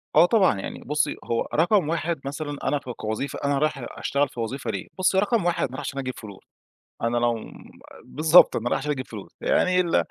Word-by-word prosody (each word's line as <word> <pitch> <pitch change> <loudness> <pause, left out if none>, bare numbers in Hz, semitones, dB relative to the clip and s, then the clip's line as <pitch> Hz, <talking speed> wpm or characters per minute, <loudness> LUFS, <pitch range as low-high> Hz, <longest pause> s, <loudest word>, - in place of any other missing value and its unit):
آه - - +8
طبعًا، 185 - +3
يعني - - -6
بُصّي، 150 +2 0
هو 115 - -1
رقم 170 +1 +3
1 165 -1 -1
مثلًا، 145 +1 -4
أنا 145 - +1
ك 135 - -9
كوظيفة، 110 +3 -4
أنا 140 0 +1
رايح 150 -4 -1
أشتغل 140 0 0
في - - -10
وظيفة 120 +4 -3
ليه، - - -5
بُصّي، 185 +1 +3
رقم 210 -1 +1
1 175 -3 +1
أنا - - -17
رايح - - -5
عشان 140 - -4
أجيب 130 -1 -3
فلوس. 100 -4 -11 0.6
أنا 115 +1 0
لو 120 0 +2
م 110 - -10 0.5
بالضبط، 160 +3 +5
أنا 120 +1 -1
رايح - - +1
عشان 150 +2 -2
أجيب 130 -3 -4
فلوس. 105 -4 -10
يعني 185 0 +2
ال 170 - 0
145 Hz, 215 wpm, -24 LUFS, 120-170 Hz, 0.6 s, آه